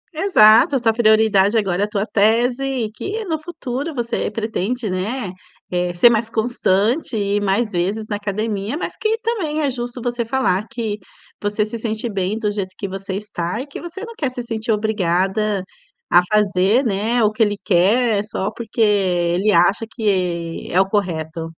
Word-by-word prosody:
Exato, 275 Hz, -, +5 dB
a -, -, +2 dB
tua 225 Hz, -2 st, +2 dB
prioridade 220 Hz, -2 st, +4 dB
agora 195 Hz, -3 st, 0 dB
é -, -, +3 dB
a -, -, -9 dB
tua 205 Hz, -1 st, -1 dB
tese, 235 Hz, +5 st, +2 dB
e 255 Hz, -5 st, -2 dB
que 420 Hz, -, -5 dB
no 320 Hz, -4 st, -2 dB
futuro 300 Hz, -2 st, -5 dB
você 235 Hz, -2 st, -1 dB
pretende, 220 Hz, +2 st, -2 dB
né, 195 Hz, +3 st, -3 dB, 0.4 s
eh, 180 Hz, 0 st, 0 dB
ser 235 Hz, +7 st, +7 dB
mais 225 Hz, 0 st, 0 dB
constante 225 Hz, -, 0 dB
e 205 Hz, 0 st, 0 dB
mais 205 Hz, +3 st, 0 dB
vezes 195 Hz, +5 st, -1 dB
na 205 Hz, -, -2 dB
academia, 210 Hz, +3 st, -3 dB
mas -, -, -4 dB
que 440 Hz, +1 st, 0 dB
também 335 Hz, -10 st, -1 dB
é 285 Hz, -2 st, +1 dB
justo 245 Hz, 0 st, -5 dB
você 240 Hz, -1 st, -1 dB
falar 225 Hz, -5 st, 0 dB
que 225 Hz, -5 st, -3 dB, 0.4 s
você 210 Hz, +1 st, 0 dB
se 225 Hz, +2 st, -6 dB
sente 220 Hz, +1 st, -2 dB
bem 195 Hz, +2 st, -1 dB
do 215 Hz, -2 st, -1 dB
jeito 195 Hz, -2 st, -4 dB
que 200 Hz, -, -4 dB
você 195 Hz, +1 st, -6 dB
está, 195 Hz, -2 st, -4 dB
e 260 Hz, -, -4 dB
que 280 Hz, -, -9 dB
você 345 Hz, +3 st, -8 dB
não 465 Hz, -, -9 dB
quer 285 Hz, -10 st, -1 dB
se 250 Hz, -1 st, -6 dB
sentir 225 Hz, -1 st, -3 dB
obrigada 205 Hz, -1 st, 0 dB, 0.5 s
a 175 Hz, -, +7 dB
fazer, 210 Hz, +4 st, +3 dB
né. 225 Hz, +3 st, +1 dB
O 210 Hz, -, +3 dB
que 215 Hz, +2 st, -5 dB
ele 205 Hz, -2 st, +3 dB
quer 205 Hz, +4 st, +3 dB
só 210 Hz, -1 st, -3 dB
porque 225 Hz, 0 st, -5 dB
ele 190 Hz, -2 st, +2 dB
acha 185 Hz, +5 st, +3 dB
que 180 Hz, -6 st, -1 dB
é 180 Hz, -, +3 dB
o 190 Hz, -, +3 dB
correto. 165 Hz, -5 st, -2 dB
215 Hz, 180 wpm, -20 LUFS, 195-240 Hz, 0.5 s, ser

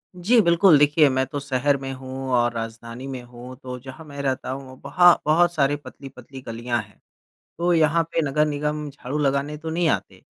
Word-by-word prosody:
जी, 210 Hz, +7 st, +3 dB
बिल्कुल 170 Hz, -2 st, +5 dB
देखिए 150 Hz, 0 st, +5 dB
मैं 130 Hz, 0 st, 0 dB
तो 145 Hz, +2 st, -4 dB
शहर 140 Hz, 0 st, 0 dB
में 135 Hz, -, -5 dB
हूँ 130 Hz, 0 st, -7 dB
और 120 Hz, 0 st, +2 dB
राजधानी 115 Hz, +2 st, -7 dB
में 130 Hz, -2 st, -6 dB
हूँ 120 Hz, +1 st, -11 dB
तो 125 Hz, -1 st, -6 dB
जहाँ 135 Hz, +5 st, -11 dB
मैं 140 Hz, -1 st, -7 dB
रहता 135 Hz, -2 st, -2 dB
हूँ 130 Hz, -1 st, -8 dB
वहाँ 175 Hz, -1 st, +6 dB
बहुत 170 Hz, +3 st, +3 dB
सारे 145 Hz, -2 st, +2 dB
पतली-पतली 135 Hz, -1 st, -11 dB
गलियाँ 120 Hz, 0 st, -2 dB
हैं। -, -, -21 dB, 0.6 s
तो 175 Hz, +1 st, +1 dB
यहाँ 165 Hz, 0 st, +3 dB
पे 165 Hz, -, +1 dB
नगर 150 Hz, +1 st, +1 dB
निगम 150 Hz, 0 st, -3 dB
झाड़ू 140 Hz, +1 st, -5 dB
लगाने 140 Hz, +1 st, 0 dB
तो 160 Hz, +1 st, -6 dB
नहीं 170 Hz, +1 st, +1 dB
आते। -, -, -2 dB
140 Hz, 190 wpm, -23 LUFS, 130-155 Hz, 0.6 s, वहाँ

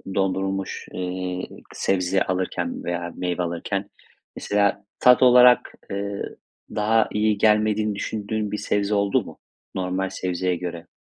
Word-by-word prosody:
dondurulmuş, 95 Hz, 0 st, -1 dB
eee, 90 Hz, 0 st, -3 dB
k -, -, -14 dB
sebze 95 Hz, 0 st, +1 dB
alırken 95 Hz, 0 st, -2 dB
veya 85 Hz, 0 st, -3 dB
meyve 90 Hz, 0 st, -2 dB
alırken 95 Hz, +4 st, -3 dB, 0.5 s
mesela 100 Hz, -1 st, 0 dB
tat 125 Hz, 0 st, +6 dB
olarak, 125 Hz, 0 st, +6 dB, 0.2 s
ııı, 100 Hz, 0 st, -4 dB, 0.4 s
daha 110 Hz, +1 st, +3 dB
iyi 105 Hz, -1 st, +1 dB
gelmediğini 105 Hz, 0 st, +2 dB
düşündüğün 105 Hz, 0 st, -3 dB
bir 105 Hz, -, -2 dB
sebze 105 Hz, 0 st, 0 dB
oldu 100 Hz, -1 st, +2 dB
mu, -, -, -12 dB, 0.4 s
normal 95 Hz, +1 st, -1 dB
sebzeye 90 Hz, 0 st, -1 dB
göre? 85 Hz, -1 st, -6 dB
100 Hz, 125 wpm, -24 LUFS, 90-105 Hz, 0.5 s, tat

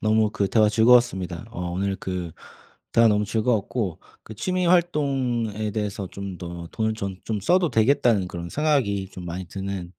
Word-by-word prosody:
너무 110 Hz, 0 st, +2 dB
그 105 Hz, -2 st, -1 dB
대화 110 Hz, 0 st, +4 dB
즐거웠습니다. 110 Hz, -6 st, +3 dB
어 90 Hz, -4 st, -4 dB
오늘 95 Hz, +2 st, -1 dB
그 90 Hz, -3 st, -4 dB, 0.6 s
대화 115 Hz, 0 st, +6 dB
너무 105 Hz, -1 st, +2 dB
즐거웠고 110 Hz, -3 st, -1 dB, 0.2 s
그 110 Hz, -, -10 dB
취미 180 Hz, -, -1 dB
활동에 135 Hz, -, +1 dB
대해서 105 Hz, -2 st, -3 dB
좀 100 Hz, -1 st, -7 dB
더 85 Hz, 0 st, -7 dB
돈을 110 Hz, 0 st, 0 dB
좀 100 Hz, -3 st, -4 dB
좀 110 Hz, -2 st, -2 dB
써도 175 Hz, -, +2 dB
되겠다는 110 Hz, -4 st, +3 dB
그런 85 Hz, -1 st, -6 dB
생각이 125 Hz, -, 0 dB
좀 90 Hz, -, -9 dB
많이 90 Hz, +2 st, -5 dB
드는 95 Hz, -1 st, -5 dB
105 Hz, 325 characters per minute, -24 LUFS, 95-120 Hz, 0.6 s, 대화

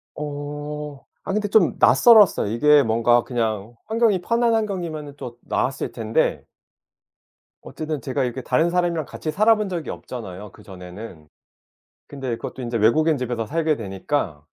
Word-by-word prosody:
어. 145 Hz, 0 st, -6 dB, 0.2 s
아 195 Hz, -, -3 dB
근데 205 Hz, -1 st, -1 dB
좀 195 Hz, -7 st, +3 dB
낯설었어요. 205 Hz, -, +6 dB
이게 150 Hz, +5 st, +5 dB
뭔가 115 Hz, +1 st, +3 dB
그냥 115 Hz, -2 st, -3 dB
환경이 220 Hz, -4 st, +1 dB
편한 230 Hz, +3 st, +1 dB
환경이면은 170 Hz, -9 st, -3 dB
또 120 Hz, -1 st, -8 dB
나았을 135 Hz, +2 st, -2 dB
텐데 110 Hz, -1 st, -1 dB, 1.2 s
어쨌든 155 Hz, -2 st, -5 dB
제가 135 Hz, 0 st, -2 dB
이렇게 125 Hz, +1 st, -3 dB
다른 165 Hz, +7 st, +1 dB
사람이랑 170 Hz, -3 st, 0 dB
같이 155 Hz, -, -5 dB
살아본 215 Hz, +1 st, +3 dB
적이 170 Hz, -3 st, -4 dB
없잖아요 105 Hz, -4 st, -8 dB
그전에는. 90 Hz, -3 st, -11 dB, 0.8 s
근데 135 Hz, -3 st, -6 dB
그것도 130 Hz, -, -7 dB
인제 120 Hz, -1 st, -2 dB
외국인 155 Hz, +8 st, +3 dB
집에서 120 Hz, -3 st, -3 dB
살게 155 Hz, +3 st, 0 dB
되니까 95 Hz, -, -3 dB
145 Hz, 325 characters per minute, -22 LUFS, 115-170 Hz, 1.2 s, 낯설었어요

